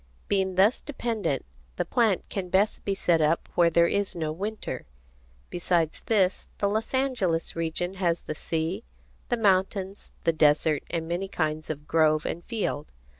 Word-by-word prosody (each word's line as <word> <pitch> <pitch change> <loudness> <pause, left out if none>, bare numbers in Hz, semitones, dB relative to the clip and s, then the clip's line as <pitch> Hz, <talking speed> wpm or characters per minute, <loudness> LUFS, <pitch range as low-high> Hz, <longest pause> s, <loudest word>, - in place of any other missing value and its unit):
Being 190 -2 +1
thus 200 +6 +4
dependent, 230 - -2 0.3
the - - -1
plant 225 -6 +2
can 190 -3 -4
best 195 +4 +2
be 195 - -1
set 170 -4 +2
up 155 +2 +2
where 170 -1 +5
there 170 0 +4
is 200 +1 0
no 160 -2 -2
winter. 195 - -5 0.6
Besides 170 -2 0
this, 195 -4 +2
the 200 - +1
Los 220 +5 -1
Angeles 220 -12 0
region 165 +2 -1
has 170 -2 +1
the - - -5
sea, 165 +7 -2 0.5
the 240 - +1
mountains, 195 -1 +1
the 165 - +3
desert, 150 0 +3
and 165 -1 -2
many 175 +3 -2
kinds 155 -4 -2
of 150 -1 -5
grove 155 -1 +3
and 170 - -3
field. 205 -10 -2
175 Hz, 160 wpm, -27 LUFS, 160-200 Hz, 0.6 s, where